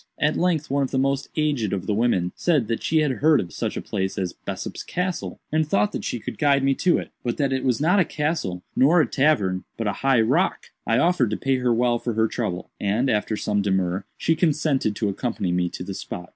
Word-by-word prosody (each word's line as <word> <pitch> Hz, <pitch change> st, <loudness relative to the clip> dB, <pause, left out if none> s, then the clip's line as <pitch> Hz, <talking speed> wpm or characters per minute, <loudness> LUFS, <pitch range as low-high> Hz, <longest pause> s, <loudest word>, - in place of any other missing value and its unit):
At 150 Hz, +1 st, +1 dB
length 170 Hz, -5 st, 0 dB
one 140 Hz, 0 st, +2 dB
of 135 Hz, -, 0 dB
the 135 Hz, -, -2 dB
most 135 Hz, +1 st, 0 dB
aged 140 Hz, -10 st, 0 dB
of 95 Hz, -2 st, -3 dB
the 105 Hz, -, 0 dB
women 100 Hz, -5 st, +1 dB
said 150 Hz, -10 st, +1 dB
that 115 Hz, -, -1 dB
she 160 Hz, -1 st, +2 dB
had 150 Hz, -3 st, +1 dB
heard 150 Hz, +4 st, +3 dB
of 85 Hz, -, -5 dB
such -, -, -3 dB
a -, -, -4 dB
place 95 Hz, 0 st, -3 dB
as 90 Hz, -2 st, -2 dB
Bessop's -, -, -6 dB
Castle, 180 Hz, 0 st, -3 dB
and 155 Hz, +1 st, +2 dB
thought 105 Hz, -7 st, +2 dB
that -, -, -5 dB
she 120 Hz, -, -3 dB
could -, -, -7 dB
guide 140 Hz, -2 st, +3 dB
me 135 Hz, 0 st, +3 dB
to 175 Hz, +6 st, +2 dB
it, -, -, -6 dB
but 120 Hz, -, -2 dB
that 140 Hz, -2 st, +1 dB
it 130 Hz, -, -1 dB
was 125 Hz, -3 st, +1 dB
not 175 Hz, +7 st, +3 dB
a -, -, +5 dB
castle 150 Hz, -, -2 dB
nor 155 Hz, +7 st, +5 dB
a 155 Hz, -, +4 dB
tavern, 115 Hz, -9 st, +1 dB
but 115 Hz, -, -3 dB
a 100 Hz, -, 0 dB
high 135 Hz, -3 st, +4 dB
rock. 110 Hz, -, 0 dB, 0.2 s
"I 115 Hz, -, +3 dB
offered 150 Hz, -5 st, +3 dB
to 105 Hz, -, -2 dB
pay 135 Hz, -1 st, +1 dB
her 125 Hz, -1 st, +1 dB
well 120 Hz, 0 st, +2 dB
for 120 Hz, -, -3 dB
her 110 Hz, +1 st, +2 dB
trouble, 105 Hz, -7 st, -4 dB
and, 110 Hz, +7 st, +1 dB
after 105 Hz, 0 st, 0 dB
some 105 Hz, -1 st, 0 dB
demur, 95 Hz, -1 st, 0 dB
she 165 Hz, -, +1 dB
consented 150 Hz, -, +1 dB
to 105 Hz, -, -1 dB
accompany 100 Hz, -3 st, -2 dB
me 90 Hz, 0 st, +1 dB
to -, -, -7 dB
the 95 Hz, +1 st, -5 dB
spot. 90 Hz, -2 st, -7 dB
125 Hz, 240 wpm, -24 LUFS, 105-150 Hz, 0.2 s, a